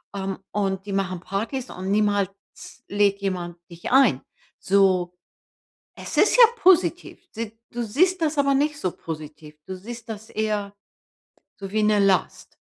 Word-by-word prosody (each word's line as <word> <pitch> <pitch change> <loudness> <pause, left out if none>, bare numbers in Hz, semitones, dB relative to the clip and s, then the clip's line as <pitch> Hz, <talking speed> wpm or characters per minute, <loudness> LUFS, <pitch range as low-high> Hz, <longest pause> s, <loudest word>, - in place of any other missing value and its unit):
ähm, 195 -1 -4
und 195 -1 -1
die 200 - -4
machen 185 -2 -2
Partys 225 +8 -4
und 185 +1 -5
niemals 205 -2 +2 0.6
lädt 200 -1 +2
jemand 180 -3 -3
dich 170 +6 -7
ein. 270 +1 +5 0.4
So 185 -2 +2 0.8
es - - -7
ist 420 - +5
ja - - +10
positiv, 360 -2 +2
sieht 225 0 -6
du 240 0 -4
siehst 355 - +2
das 310 -1 0
aber 280 0 +3
nicht 295 +1 +1
so 185 - 0
positiv. 155 -1 -9
Du 190 - -6
siehst 230 +4 -9
das 220 +1 -7
eher 210 -2 -2 0.9
so 195 - -6
wie 215 0 +1
'ne 210 -1 +3
Last. 195 -3 0
205 Hz, 150 wpm, -24 LUFS, 190-235 Hz, 0.9 s, ja